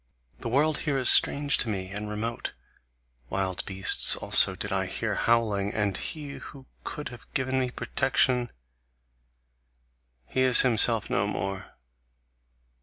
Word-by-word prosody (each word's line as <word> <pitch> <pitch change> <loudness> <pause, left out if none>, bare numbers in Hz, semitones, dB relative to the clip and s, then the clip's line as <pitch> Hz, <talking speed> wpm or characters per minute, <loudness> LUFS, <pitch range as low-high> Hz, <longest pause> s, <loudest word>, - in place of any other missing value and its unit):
The - - -6
world 145 +5 0
here 145 -4 -2
is 130 - +3
strange 145 0 +1
to 115 - -1
me, 95 -2 -5
and 105 +1 -6
remote; 115 +2 -5 0.8
wild 95 -1 -3
beasts 95 0 +5
also - - +5
did - - -6
I - - -2
hear - - -4
howling; 105 -4 -1
and 100 -3 -1
he 150 - -7
who 135 -2 -13 0.2
could 150 - -7
have 120 -2 -15
given 130 -1 -1
me 130 -1 -2
protection 125 -1 -1 1.8
he 130 - -3
is 130 -2 +6
himself 115 -2 +3
no 100 +1 0
more. 95 -2 -6
115 Hz, 135 wpm, -26 LUFS, 100-130 Hz, 1.8 s, is